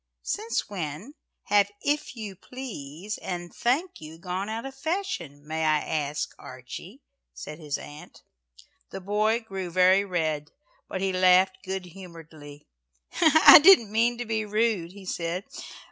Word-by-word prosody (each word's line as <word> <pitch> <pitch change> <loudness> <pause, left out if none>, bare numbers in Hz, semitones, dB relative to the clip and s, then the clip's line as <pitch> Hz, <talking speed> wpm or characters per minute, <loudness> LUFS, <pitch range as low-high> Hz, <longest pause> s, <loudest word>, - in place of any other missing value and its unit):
"Since 440 +3 -2
when, 180 - -6 0.3
have 205 -1 +3
'if 295 -2 -1
you 210 -4 -7
please' 205 - -8
and 175 -1 -6
'thank 310 +10 -1
you,' 155 +1 -10
gone 185 +3 -4
out 225 +3 -4
of 270 - -7
fashion, 270 - -4
may 160 +1 -3
I 155 -1 +3
ask, 150 -1 -3
Archie?" - - -10 0.3
said 150 - -8
his 150 -3 -3
aunt. 150 +1 -12 0.7
The - - -7
boy 210 +4 0
grew 195 -5 -6
very 185 +3 +4
red, 160 -6 -2 0.4
but 185 - -5
he 195 -1 0
laughed 185 +1 +4
good 190 -1 -4
humouredly. 165 -5 -12 0.6
"I 315 -2 +9
didn't 300 - +7
mean 235 +2 +2
to 245 - -4
be 220 -1 -1
rude," 210 -5 0
he 200 -1 -12
said. 175 +1 -3
190 Hz, 145 wpm, -26 LUFS, 165-225 Hz, 0.7 s, I